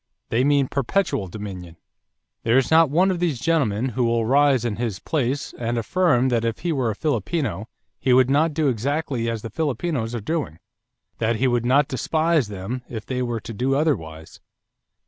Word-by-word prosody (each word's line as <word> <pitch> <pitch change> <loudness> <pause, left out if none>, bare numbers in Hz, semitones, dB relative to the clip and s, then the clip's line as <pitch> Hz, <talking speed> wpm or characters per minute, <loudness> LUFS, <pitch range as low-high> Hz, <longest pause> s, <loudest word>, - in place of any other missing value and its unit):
They 120 +3 +2
mean 140 -1 +3
perpetual 140 - -1
dominion.... 90 -4 -8 0.6
There 115 +3 +3
is 135 - +1
not 160 -1 +6
one 180 +6 +3
of 180 - -2
these 165 -8 0
gentlemen 130 -7 +1
who 125 +1 -1
will 115 -1 +1
rise 135 -1 +3
in 110 -4 -2
his 115 -5 -2
place 140 +2 -2
and 120 0 -1
affirm 130 0 +2
that 115 -2 +1
if 115 -1 -1
he 175 +1 -1
were 130 -5 0
a 110 - -2
Filipino 140 - -2 0.3
he 130 - +1
would 125 0 +5
not 150 +3 +2
do 155 -2 +1
exactly 130 0 -1
as 115 -2 -4
the 115 - -6
Filipinos 135 -3 -2
are - - -2
doing; 145 - -3 0.6
that 115 0 +1
he 130 +4 +1
would 120 -1 +1
not 140 +3 +4
despise 155 +1 +1
them 105 +5 -5
if 110 -3 -6
they 130 -1 -2
were 120 -2 -2
to 115 - -7
do 130 +5 0
otherwise. 80 - -2
125 Hz, 185 wpm, -23 LUFS, 115-145 Hz, 0.6 s, not